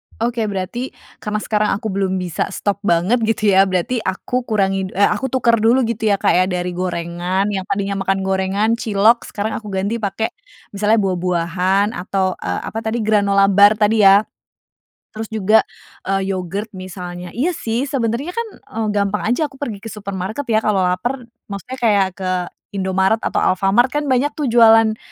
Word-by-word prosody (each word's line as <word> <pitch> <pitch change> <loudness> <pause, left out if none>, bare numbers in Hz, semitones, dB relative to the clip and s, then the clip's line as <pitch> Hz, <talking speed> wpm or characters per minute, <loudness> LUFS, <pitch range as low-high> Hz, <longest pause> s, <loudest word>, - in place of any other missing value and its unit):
Oke 230 -1 -1
berarti, 205 +6 -4 0.2
karena 210 0 -3
sekarang 210 -2 +1
aku 215 +1 -4
belum 190 -1 -1
bisa 180 -3 -2
stop 200 +1 -2
banget, 200 +4 +2
gitu 215 -2 +2
ya? 195 +1 +5
Berarti 190 +6 -1
aku 240 +6 -3
kurangi, 195 -3 0
eh, 200 - +3
aku 265 - -1
tuker 235 -3 +2
dulu 240 +4 +3
gitu 225 -1 -1
ya, 205 - +4
Kak, - - +1
ya? 185 +1 +3
Dari 180 -1 -2
gorengan, 175 +1 -2
yang 190 -2 -3
tadinya 200 0 -2
makan 195 0 0
gorengan, 190 +3 0
cilok. 220 +2 +2
Sekarang 215 +2 -3
aku 215 - -12
ganti 200 +4 -2
pakai, 210 +2 -2 0.4
misalnya 210 +2 +2
buah-buahan, 185 +2 0
atau, 190 -3 -1
eee, - - -3
apa 220 - -4
tadi, 225 +1 -2
granola 200 -2 +3
bar 205 +2 +6
tadi 210 -1 +4
ya? 200 +2 +7 0.9
Terus 220 0 -6
juga, 220 0 +3 0.5
eee, 195 0 0
yogurt 195 +4 -4
misalnya. 180 -1 -7
Iya 320 +9 +1
sih, 235 -4 -2
sebenernya 270 +3 -2
kan, 465 +1 -3
eee, 220 -1 -5
gampang 205 0 0
aja 245 +7 +1
aku 270 - -17
pergi 220 -6 -5
ke 225 - -6
supermarket 200 +5 -5
ya? 220 -1 +2
Kalau 210 -3 +2
laper, 235 +8 -1 0.2
maksudnya 205 +6 -7
kayak 205 -6 +2
ke 185 -1 -2 0.4
Indomaret 190 +3 +1
atau - - -1
Alfamart 195 +6 +3
kan 295 +3 -2
banyak 260 +3 +1
tuh, 290 -5 -2
jualan, 225 -1 +5
205 Hz, 170 wpm, -19 LUFS, 190-225 Hz, 0.9 s, ya